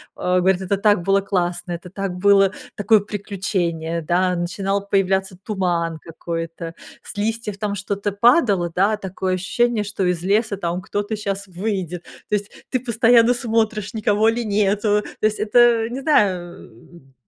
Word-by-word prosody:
Он 180 Hz, 0 st, +1 dB
говорит: 190 Hz, 0 st, +2 dB
"Это 195 Hz, +1 st, -1 dB
так 205 Hz, -3 st, +3 dB
было 195 Hz, +1 st, +3 dB
классно, 175 Hz, -2 st, -2 dB
это 175 Hz, +1 st, -8 dB
так 195 Hz, 0 st, -4 dB
было 195 Hz, +1 st, +4 dB, 0.2 s
такое 215 Hz, +1 st, +4 dB
приключение"- 185 Hz, -5 st, -3 dB
да, 180 Hz, +3 st, +1 dB
начинал 195 Hz, +3 st, -2 dB
появляться 190 Hz, -1 st, +1 dB
туман 175 Hz, -5 st, -2 dB
какой-то, 165 Hz, 0 st, -6 dB, 0.3 s
с -, -, -10 dB
листьев 215 Hz, -1 st, -2 dB
там 205 Hz, -1 st, -2 dB
что-то 200 Hz, +1 st, -3 dB
падало, 200 Hz, -, +3 dB
да, 205 Hz, +3 st, +2 dB
такое 190 Hz, -1 st, -3 dB
ощущение, 225 Hz, +4 st, 0 dB
что 205 Hz, -1 st, -3 dB
из 180 Hz, -2 st, 0 dB
леса 205 Hz, +1 st, +1 dB
там 175 Hz, 0 st, -3 dB
кто-то 205 Hz, +3 st, -3 dB
щас 200 Hz, -1 st, -4 dB
выйдет. 180 Hz, -2 st, -4 dB, 0.3 s
То 210 Hz, -, +2 dB
есть 205 Hz, 0 st, -3 dB, 0.2 s
ты 255 Hz, -, +1 dB
постоянно 235 Hz, 0 st, +4 dB
смотришь, 225 Hz, -3 st, -1 dB
никого 215 Hz, 0 st, +2 dB
ли 235 Hz, +1 st, -1 dB
нету. 210 Hz, 0 st, +1 dB, 0.2 s
То -, -, +2 dB
есть 215 Hz, -, -4 dB
это, 215 Hz, +3 st, +3 dB
э, 235 Hz, -1 st, +4 dB
не 260 Hz, +3 st, -5 dB
знаю, 190 Hz, -, +2 dB
э, 115 Hz, +8 st, -16 dB
м, 135 Hz, -3 st, -21 dB
200 Hz, 165 wpm, -21 LUFS, 180-215 Hz, 0.3 s, было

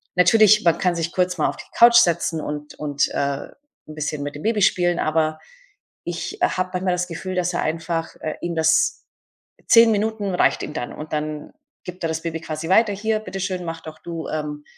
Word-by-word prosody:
natürlich, 215 Hz, +4 st, +5 dB
man 170 Hz, -, +4 dB
kann 180 Hz, -2 st, +1 dB
sich 165 Hz, 0 st, -2 dB
kurz 180 Hz, -1 st, 0 dB
mal 155 Hz, -, +2 dB
auf -, -, -5 dB
die -, -, -10 dB
Couch 235 Hz, 0 st, +6 dB
setzen 170 Hz, -6 st, +2 dB
und 150 Hz, 0 st, -6 dB
und, 145 Hz, -2 st, 0 dB
äh, -, -, -10 dB, 0.7 s
'n 155 Hz, -, -10 dB
bisschen 150 Hz, -1 st, -3 dB
mit 145 Hz, 0 st, -5 dB
dem 145 Hz, -, -8 dB
Baby 220 Hz, -1 st, +1 dB
spielen, 175 Hz, -2 st, +2 dB
aber 155 Hz, 0 st, 0 dB, 0.7 s
ich 175 Hz, 0 st, -5 dB
habe 185 Hz, 0 st, 0 dB
manchmal 180 Hz, 0 st, 0 dB
das 180 Hz, 0 st, -1 dB
Gefühl, 185 Hz, +2 st, -5 dB
dass 180 Hz, 0 st, 0 dB
er -, -, -1 dB
einfach 165 Hz, +1 st, -3 dB
äh, 155 Hz, -, -3 dB
ihm 175 Hz, -1 st, -3 dB
das 160 Hz, 0 st, +2 dB, 0.6 s
10 230 Hz, -1 st, +7 dB
Minuten 210 Hz, -2 st, -1 dB
reicht -, -, +2 dB
ihm 150 Hz, -, -6 dB
dann 120 Hz, -, -4 dB
und 155 Hz, +1 st, -9 dB
dann 150 Hz, 0 st, -4 dB, 0.3 s
gibt 180 Hz, 0 st, -8 dB
er -, -, +1 dB
das 160 Hz, 0 st, -3 dB
Baby 165 Hz, -1 st, -4 dB
quasi 160 Hz, 0 st, -5 dB
weiter: 215 Hz, +2 st, +4 dB
„Hier, 215 Hz, +2 st, -1 dB
Bitteschön, 190 Hz, -3 st, -4 dB
mach 165 Hz, -1 st, -5 dB
doch 155 Hz, -1 st, -10 dB
du, 165 Hz, 0 st, -6 dB
ähm, 150 Hz, -1 st, -4 dB
170 Hz, 205 wpm, -22 LUFS, 155-185 Hz, 0.7 s, 10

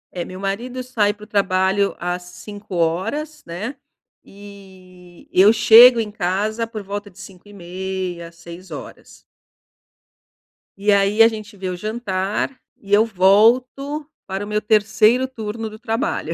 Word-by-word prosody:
Eh 175 Hz, -, -3 dB
meu 185 Hz, 0 st, -9 dB
marido 235 Hz, +6 st, -4 dB
sai 220 Hz, -5 st, +1 dB
pro 210 Hz, 0 st, -13 dB
trabalho 195 Hz, -1 st, +1 dB
às 175 Hz, +1 st, -3 dB
5h00 200 Hz, -, -4 dB
né. 195 Hz, +11 st, -6 dB, 0.5 s
E 190 Hz, -3 st, -16 dB
eu 195 Hz, +3 st, +6 dB
chego 230 Hz, +2 st, +8 dB
em 210 Hz, -2 st, -3 dB
casa 215 Hz, +4 st, -2 dB
por 220 Hz, -3 st, -7 dB
volta 205 Hz, +1 st, -6 dB
de 180 Hz, -, -24 dB
5h30, 185 Hz, -2 st, -7 dB
6h00. 170 Hz, +2 st, -11 dB, 1.6 s
E 205 Hz, +1 st, +1 dB
aí 200 Hz, +2 st, +3 dB
a 225 Hz, -, +9 dB
gente 215 Hz, -2 st, -7 dB
vê 190 Hz, -1 st, -5 dB
o 180 Hz, -, -3 dB
jantar 210 Hz, +3 st, -3 dB, 0.2 s
e 200 Hz, 0 st, -7 dB
eu 215 Hz, +2 st, +6 dB
volto 240 Hz, +9 st, +2 dB, 0.2 s
para 195 Hz, +1 st, -4 dB
o -, -, -7 dB
meu 210 Hz, 0 st, -1 dB
terceiro 215 Hz, +4 st, +3 dB
turno 225 Hz, -3 st, -6 dB
do 215 Hz, -, -11 dB
trabalho. 235 Hz, +8 st, -2 dB
205 Hz, 130 wpm, -20 LUFS, 185-225 Hz, 1.6 s, a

